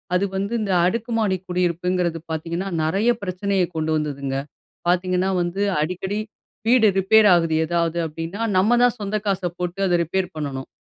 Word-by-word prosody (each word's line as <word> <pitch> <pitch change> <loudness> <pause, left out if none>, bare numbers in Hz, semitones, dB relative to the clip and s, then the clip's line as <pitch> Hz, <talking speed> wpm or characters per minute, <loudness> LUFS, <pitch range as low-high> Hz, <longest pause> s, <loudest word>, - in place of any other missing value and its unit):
அது 195 - +2
வந்து 200 +4 -2
இந்த 200 -2 -1
அடுக்கு 230 +5 -1
மாடி 195 -4 +1
குடியிருப்புங்கிறது 180 -1 0
பார்த்தீங்கன்னா, 170 +4 -3
நிறைய 195 +9 +1
பிரச்சனையை 190 0 0
கொண்டு 160 0 -1
வந்ததுங்க. 140 -3 -3 0.5
பார்த்தீங்கன்னா 185 +1 +1
வந்து 175 +3 -2 0.2
அடிக்கடி 185 +6 -2 0.5
வீடு 235 -2 +5
ரிப்பேர் 210 +3 +5
ஆகுது 165 -2 +1
ஏதாவது 170 0 0
அப்படின்னா, 165 +7 -6 0.2
நம்ம 220 +6 +4
தான் 245 0 +3
சொந்த 205 0 -3
காச 195 -1 0 0.2
போட்டு 180 +2 -3
அத 175 - +2
ரிப்பேர் 185 +3 -1
பண்ணணும். 140 -3 -4
180 Hz, 150 wpm, -22 LUFS, 165-200 Hz, 0.5 s, வீடு